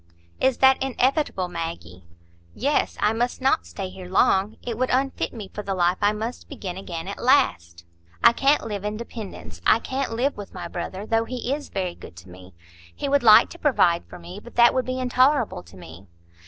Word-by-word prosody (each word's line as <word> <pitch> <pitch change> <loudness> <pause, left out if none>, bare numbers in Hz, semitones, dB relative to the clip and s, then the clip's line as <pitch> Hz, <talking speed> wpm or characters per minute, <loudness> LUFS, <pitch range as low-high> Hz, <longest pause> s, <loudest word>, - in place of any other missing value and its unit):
"Is 265 -2 +2
that 265 0 +5
inevitable, 265 - 0
Maggie?" 165 - -6 0.5
"Yes; 285 +4 0
I 210 +1 +3
must 240 +2 -1
not 260 - +1
stay 85 - -6
here 185 -1 -10
long. 195 +2 +2
It 235 -2 -4
would 255 +3 -1
unfit 265 +1 0
me 215 -4 -8
for 210 - -4
the 195 -2 -3
life 175 0 +1
I 205 0 +4
must 220 +3 -6
begin 180 -3 -6
again 175 -3 -6
at 200 - -6
last. 85 - +2 0.4
I - - +8
can't 275 +2 +2
live 205 -3 -4
in 210 0 -3
dependence,—I 215 - -2
can't 260 +1 -3
live 255 +5 0
with 205 -2 -9
my - - -5
brother, 185 +3 -6
though 225 +1 +1
he 250 +1 -3
is 290 0 -5
very 185 -2 -3
good - - -13
to 85 +2 -13
me. 90 0 -14 0.4
He - - -3
would 280 0 +3
like 215 -3 +7
to 345 - -11
provide 215 - +3
for 90 +1 -11
me; 85 0 -10
but 240 - -15
that 235 0 +6
would 255 -1 0
be 255 0 -3
intolerable 255 - +2
to 90 +1 -17
me." 90 +2 -12
215 Hz, 200 wpm, -24 LUFS, 175-255 Hz, 0.5 s, I